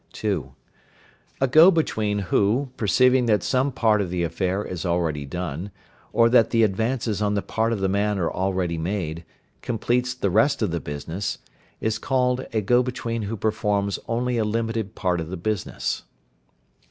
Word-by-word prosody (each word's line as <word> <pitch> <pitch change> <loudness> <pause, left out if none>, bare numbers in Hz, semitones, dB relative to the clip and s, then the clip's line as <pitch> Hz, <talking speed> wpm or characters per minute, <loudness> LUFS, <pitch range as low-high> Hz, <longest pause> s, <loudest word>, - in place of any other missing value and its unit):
(2). - - -3 0.9
A 135 - +4
go 155 +7 +8
between 110 - 0 0.2
who, 120 +7 +2
perceiving 125 +4 +3
that 105 -4 +2
some 130 +2 +1
part 110 -4 +2
of 95 - -3
the 90 0 -1
affair 95 +4 -1
is 90 -2 -5
already 85 -5 -1
done, 90 +3 -4 0.4
or 115 +1 +4
that 115 -1 +4
the 115 -1 +3
advances 110 +1 0
on 105 -1 +1
the 100 - +1
part 110 +1 0
of 110 -4 -2
the 95 - +2
man 100 +1 0
are 85 -3 0
already 95 -3 -1
made, 85 -2 -3 0.4
completes 125 +2 -1
the 100 -6 -1
rest 115 +6 +3
of 100 - 0
the 85 - -1
business, 80 +7 -4 0.4
is 110 0 -1
called 125 0 0
a 110 - 0
go 120 +5 +3
between 120 -2 -3
who 110 +2 -4
performs 105 -2 0
only 120 +1 0
a - - +2
limited 115 -1 -2
part 90 -3 0
of 80 - -6
the 95 - -5
business. 105 +2 -2
105 Hz, 170 wpm, -24 LUFS, 95-120 Hz, 0.9 s, go